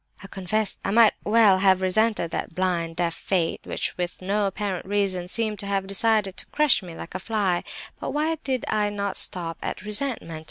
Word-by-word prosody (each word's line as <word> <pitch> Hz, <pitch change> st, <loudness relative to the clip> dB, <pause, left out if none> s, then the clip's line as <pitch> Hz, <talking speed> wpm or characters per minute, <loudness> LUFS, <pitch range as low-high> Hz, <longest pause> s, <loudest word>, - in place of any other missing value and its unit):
I -, -, -8 dB
confess 195 Hz, +2 st, -1 dB
I -, -, -1 dB
might 225 Hz, +1 st, +6 dB
well 210 Hz, -3 st, +5 dB
have 190 Hz, -1 st, +4 dB
resented 195 Hz, -2 st, +1 dB
that 165 Hz, -, -4 dB
blind, 175 Hz, -3 st, -1 dB
deaf 170 Hz, -1 st, 0 dB
fate, 170 Hz, 0 st, -1 dB
which, -, -, -3 dB
with 175 Hz, 0 st, -3 dB
no 200 Hz, +2 st, 0 dB
apparent 195 Hz, -2 st, -3 dB
reason, 195 Hz, -3 st, 0 dB
seemed 215 Hz, +1 st, -1 dB
to 200 Hz, -, -4 dB
have 195 Hz, -1 st, 0 dB
decided 200 Hz, 0 st, +1 dB
to -, -, -6 dB
crush 300 Hz, -6 st, +3 dB
me 175 Hz, -3 st, -9 dB
like 165 Hz, -, -9 dB
a 185 Hz, -, -3 dB
fly; 195 Hz, -4 st, 0 dB, 0.4 s
but -, -, -4 dB
why 305 Hz, +2 st, 0 dB
did 260 Hz, -3 st, -1 dB
I 210 Hz, -1 st, +1 dB
not 200 Hz, -1 st, -3 dB
stop 165 Hz, -2 st, +1 dB
at -, -, -4 dB
resentment? 210 Hz, -, -2 dB
195 Hz, 195 wpm, -25 LUFS, 180-215 Hz, 0.4 s, might